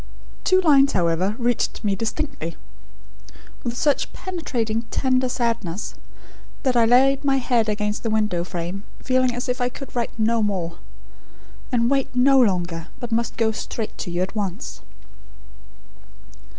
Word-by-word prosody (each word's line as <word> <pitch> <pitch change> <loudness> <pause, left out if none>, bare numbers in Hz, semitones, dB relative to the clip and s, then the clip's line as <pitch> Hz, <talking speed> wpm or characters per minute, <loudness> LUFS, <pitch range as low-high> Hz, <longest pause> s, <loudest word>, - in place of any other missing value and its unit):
Two 370 0 +4
lines, 280 -5 +5
however, 180 +3 +1
reached 240 -1 0
me 200 -2 +1
distinctly, 225 - -3 1.1
with 240 0 -3
such 290 +1 +1
penetrating, 245 -12 -2
tender 255 -1 +1
sadness, 230 -7 -2 0.7
that 260 -3 +2
I 235 -1 +5
laid 265 +4 +4
my 275 -1 +3
head 240 -4 +1
against 210 0 -1
the 230 - -2
window 210 -5 +1
frame, 180 +3 -5 0.2
feeling 255 -1 +1
as 245 - -3
if 250 0 -1
I 245 - +2
could 270 +1 -10
write 235 -1 -2
no 225 +1 +2
more, 180 -5 -2 0.9
and 235 -2 +2
wait 270 -1 0
no 265 +2 +6
longer, 175 -6 0
but 240 -1 -6
must 230 0 0
go 225 -1 +2
straight 220 0 -5
to - - -4
you 175 +1 0
at 190 - -5
once." 195 -4 -4
230 Hz, 145 wpm, -23 LUFS, 200-255 Hz, 1.1 s, no